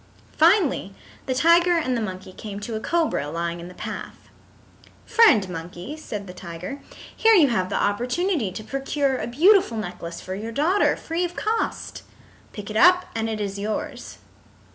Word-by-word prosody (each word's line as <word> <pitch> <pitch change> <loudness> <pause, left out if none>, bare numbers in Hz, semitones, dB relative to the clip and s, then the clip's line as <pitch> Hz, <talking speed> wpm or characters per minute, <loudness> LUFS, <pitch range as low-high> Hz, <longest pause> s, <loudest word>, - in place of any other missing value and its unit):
Finally 320 - +3 0.3
the 260 - 0
tiger 340 +4 +4
and 255 -6 0
the 235 - -1
monkey 185 -2 -6
came 205 0 -7
to 210 +3 -6
a 220 - -2
cobra 310 - 0
lying 170 +2 -3
in 170 - -8
the 180 - -12
path. - - -8 0.8
"Friend 365 - +5
Monkey," 175 - -7
said 210 -10 -6
the 180 - -9
tiger, 180 +9 -8 0.3
"here 450 0 +5
you 310 -8 +6
have 185 -6 0
the - - -2
opportunity 250 - 0
to 215 - -7
procure 275 +2 -1
a - - -3
beautiful 320 - +4
necklace 175 -4 -6
for 185 - -6
your 215 +4 -5
daughter, 330 - +2
free 330 +2 -3
of 355 0 -3
cost. 445 +1 -2 0.5
Pick 205 0 -8
it - - -7
up 360 +6 +5
and 225 0 -2
it 220 -1 -3
is 200 -1 -3
yours." 210 +1 -4
230 Hz, 170 wpm, -24 LUFS, -, 0.8 s, you